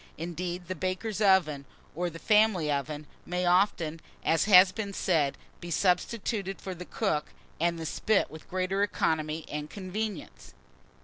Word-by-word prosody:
Indeed, 175 Hz, +2 st, -4 dB
the 185 Hz, -, -2 dB
baker's 185 Hz, +4 st, -3 dB
oven, 180 Hz, -8 st, +3 dB, 0.3 s
or 175 Hz, +2 st, -1 dB
the 165 Hz, -, -9 dB
family 210 Hz, -6 st, +3 dB
oven, 145 Hz, +1 st, -3 dB, 0.2 s
may 180 Hz, +1 st, -2 dB
often, 175 Hz, -3 st, +2 dB, 0.3 s
as 160 Hz, -2 st, +3 dB
has 185 Hz, -2 st, +8 dB
been 200 Hz, 0 st, -4 dB
said, 155 Hz, -8 st, +1 dB, 0.2 s
be 175 Hz, -, -8 dB
substituted 195 Hz, -, 0 dB
for 190 Hz, -, -5 dB
the 180 Hz, 0 st, -8 dB
cook 165 Hz, -9 st, -1 dB, 0.3 s
and 170 Hz, +1 st, +1 dB
the 165 Hz, -, -5 dB
spit 215 Hz, +6 st, +1 dB
with 155 Hz, -, -12 dB
greater 185 Hz, +2 st, -1 dB
economy 160 Hz, -5 st, 0 dB
and 150 Hz, 0 st, -5 dB
convenience. 200 Hz, 0 st, -6 dB
180 Hz, 145 wpm, -29 LUFS, 160-195 Hz, 0.3 s, has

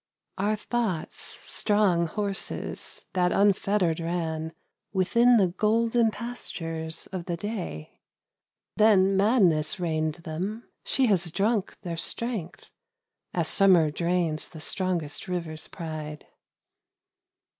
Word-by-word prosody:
Our 210 Hz, +2 st, +2 dB
thoughts, 215 Hz, -5 st, -2 dB, 0.3 s
strong 200 Hz, -5 st, +2 dB
horses 200 Hz, +3 st, -5 dB
that 180 Hz, -1 st, +2 dB
unfettered 195 Hz, -4 st, +2 dB
ran 165 Hz, -2 st, -2 dB, 0.4 s
Within 235 Hz, +6 st, +4 dB
the 200 Hz, -, +5 dB
golden 225 Hz, +4 st, +2 dB
pastures 165 Hz, -9 st, -4 dB
of 185 Hz, -3 st, -4 dB
the 175 Hz, -2 st, -2 dB
Day: 180 Hz, -, -5 dB, 0.8 s
Then 195 Hz, -3 st, +5 dB
madness 190 Hz, -7 st, +3 dB
reined 155 Hz, -3 st, 0 dB
them; 180 Hz, +7 st, -5 dB, 0.2 s
she 265 Hz, -, +2 dB
has 190 Hz, -6 st, +2 dB
drunk 205 Hz, +4 st, 0 dB
their 170 Hz, -2 st, -4 dB
strength 220 Hz, -2 st, -3 dB, 0.6 s
As 170 Hz, -3 st, +1 dB
summer 180 Hz, -6 st, +5 dB
drains 170 Hz, -1 st, 0 dB
the 160 Hz, -, -11 dB
strongest 170 Hz, -3 st, -1 dB
rivers' 165 Hz, -3 st, -4 dB
pride. 155 Hz, -2 st, -6 dB
180 Hz, 100 wpm, -27 LUFS, 165-210 Hz, 0.8 s, the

